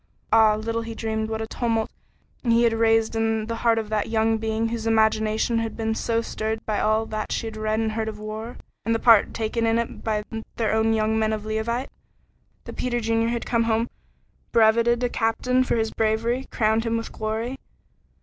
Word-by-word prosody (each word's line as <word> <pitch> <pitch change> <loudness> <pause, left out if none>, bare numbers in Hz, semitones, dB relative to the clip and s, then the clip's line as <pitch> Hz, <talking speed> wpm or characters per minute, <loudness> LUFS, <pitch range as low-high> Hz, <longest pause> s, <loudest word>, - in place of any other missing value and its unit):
Ah, 220 -1 +6
little 225 +2 -2
he 225 0 -6
dreamed 220 -1 -2
what 220 0 -2
a - - -5
tumult 225 -1 -1 0.5
he 235 -1 +3
had 230 -1 +3
raised 225 0 +2
in 225 -1 0
the 230 +1 -4
heart 230 -1 +2
of 220 -2 -2
that 215 -1 -1
young 225 0 +2
being 220 +1 -1
whose 230 -1 -3
imagination 220 +1 +2
had 225 -1 -4
been 220 -1 -1
so 230 +1 -1
stirred 220 0 -3
by 215 -1 -1
all 215 +1 +2
that 215 -1 -4
she - - -2
had 220 -1 -6
read 215 0 -1
and 220 -1 0
heard 220 0 -2
of 215 - -7
war, 215 +2 -6 0.3
and 230 0 +1
the - - 0
part 225 -4 +5
taken 230 +1 -1
in 225 0 +2
it 235 0 -3
by 215 -1 -1 0.3
their 225 -2 0
own 220 0 +2
young 220 0 +1
men 220 0 +1
of 215 -1 -4
Leauvite. 230 +4 -2 0.7
That - - -9
Peter 240 -1 -1
Junior 225 0 +1
had 235 0 -2
come 230 -1 +1
home 230 +1 0 0.6
brevetted 235 +2 +4
a - - +3
captain 250 +3 +1
for 255 - 0
his 225 -1 0
bravery 230 +4 0
crowned 220 0 +1
him 230 0 0
with 230 - -5
glory. 225 +4 -3
225 Hz, 205 wpm, -24 LUFS, 220-230 Hz, 0.7 s, Ah